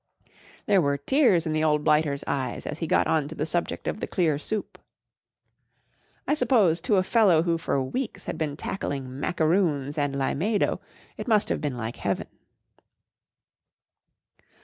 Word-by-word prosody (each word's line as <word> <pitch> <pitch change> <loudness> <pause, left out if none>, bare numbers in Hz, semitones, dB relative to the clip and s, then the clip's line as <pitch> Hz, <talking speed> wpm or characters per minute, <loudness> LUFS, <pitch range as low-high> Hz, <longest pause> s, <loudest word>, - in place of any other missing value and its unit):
There 200 -3 +4
were 140 -2 +1
tears 195 - +3
in 155 - -1
the 155 0 +1
old 150 -1 +2
blighter's 150 -2 +2
eyes 135 -2 -3
as 150 - -5
he 165 - -2
got - - +3
on 155 -3 +1
the 155 0 -3
subject 170 +2 -2
of - - -2
the - - -3
clear 160 -6 +1
soup. 215 +6 -4 1.5
I - - +3
suppose 225 - +3
to 215 +1 +2
a 185 - +3
fellow 190 -6 +4
who 170 -1 0
for 150 - 0
weeks 235 - -4
had - - -4
been 150 -2 -3
tackling 135 -8 -4
macaroons 155 -3 +1
and 145 -1 0
limado 170 +10 0 0.4
it - - -6
must 215 -3 +3
have - - -1
been 145 -5 -2
like 115 0 -5
Heaven. - - -2
160 Hz, 155 wpm, -26 LUFS, 145-195 Hz, 1.5 s, There